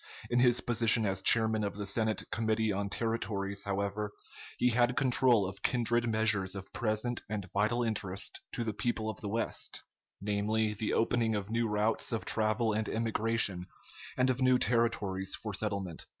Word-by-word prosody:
In 120 - +3
his 120 0 +4
position 115 -1 +3
as 95 -1 -1
chairman 110 +1 +4
of 100 - -3
the 105 0 -4
Senate 110 +2 0
Committee 110 -1 0
on 100 +1 -2
Territories, 100 -3 -2
however, 100 +1 -2 0.4
he 125 - +3
had 120 +2 +2
control 125 -6 +4
of 95 +2 -8
kindred 120 0 +1
measures 105 -4 +2
of 95 -1 -9
present 115 +2 -1
and 100 -3 -4
vital 110 +4 +1
interest 100 -4 -3
to 120 - -2
the 110 -2 -2
people 110 0 -2
of 105 - -13
the 105 - -4
West; 115 +3 -2 0.4
namely, 105 +1 0
the 105 +1 -2
opening 115 -1 +1
of 100 0 -4
new 115 0 +1
routes 105 +3 0
of 115 - -2
travel 110 0 +1
and 110 +1 -1
emigration, 110 -4 0 0.5
and 130 0 +3
of 130 +1 -3
new 130 0 +5
territories 105 -6 0
for 105 -2 -6
settlement. 100 -4 -3
110 Hz, 165 wpm, -31 LUFS, 100-115 Hz, 0.5 s, new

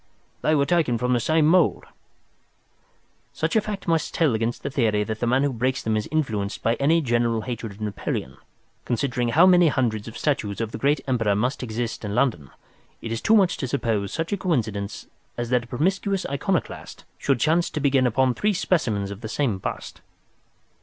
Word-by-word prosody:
"They 155 - +2
were 140 -1 +3
taken 155 -8 +2
from 125 +1 0
the 120 - +2
same 155 +6 +2
mould." 180 +4 +3 1.5
"Such - - -2
a 220 - +5
fact 205 -3 -6
must 165 -2 0
tell 155 -7 +3
against 115 +2 -2
the 140 - -3
theory 110 -6 +1
that 110 +1 -4
the 120 - -1
man 130 +3 +3
who 140 -2 0
breaks 130 +3 -1
them 110 -1 0
is 105 0 -2
influenced 110 -11 -2
by 115 - +3
any 160 +4 +3
general 120 -4 +1
hatred 115 -2 -5
of 100 - -15
Napoleon. 100 -10 -4 0.5
Considering 125 0 -1
how 160 +9 +6
many 180 -2 +6
hundreds 120 -7 0
of 115 - -8
statues 115 -9 -1
of 115 -1 -2
the - - -6
great 140 0 +2
Emperor 115 -6 +1
must 125 +7 -1
exist 115 -1 -4
in 105 -1 -3
London, 110 - 0 0.5
it 115 - -6
is 115 - -2
too 225 - +4
much 195 -4 +3
to 130 - -3
suppose 110 -7 -1
such 165 - -2
a - - 0
coincidence 110 - -2 0.3
as 120 0 -3
that 125 -2 +2
a - - -18
promiscuous 190 +9 -1
iconoclast 160 +6 -3
should 135 -3 +1
chance 165 +5 +2
to 150 - -4
begin 135 -3 +3
upon 130 +2 +2
three 210 - 0
specimens 115 - 0
of 100 +1 -8
the 110 - -6
same 115 -7 -1
bust." - - -6
125 Hz, 195 wpm, -24 LUFS, 110-155 Hz, 1.5 s, how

